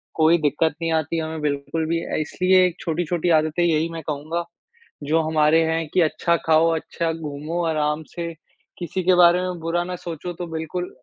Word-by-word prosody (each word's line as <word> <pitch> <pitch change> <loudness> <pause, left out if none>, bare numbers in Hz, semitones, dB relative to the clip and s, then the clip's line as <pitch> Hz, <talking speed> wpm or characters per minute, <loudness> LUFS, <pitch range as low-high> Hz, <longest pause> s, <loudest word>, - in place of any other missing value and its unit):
कोई 160 +1 +4
दिक्कत 150 +1 +1
नहीं 165 0 -1
आती 160 +1 0
हमें 160 0 -4
बिल्कुल 150 +2 -2
भी 165 +1 0
अ, - - -3
इसलिए 185 +4 +3
छोटी-छोटी 175 +1 -1
आदतें 155 +2 -1
यही 165 -1 +2
मैं 165 -1 -6
कहूँगा 155 +3 -3 0.6
जो 155 +3 +2
हमारे 155 0 +3
है 160 0 0
कि 185 - +4
अच्छा 165 +1 +1
खाओ, 160 +1 +4
अच्छा 165 +1 -2
घूमो 155 +1 -4
आराम 150 -1 0
से 170 -1 -4 0.5
किसी 180 +1 -3
के 185 +1 +4
बारे 175 0 +6
में 180 -1 -3
बुरा 165 +2 -1
ना 180 +1 -5
सोचो 175 0 -6
तो 175 - -4
बिल्कुल 160 +3 -4
165 Hz, 180 wpm, -22 LUFS, 155-175 Hz, 0.6 s, बारे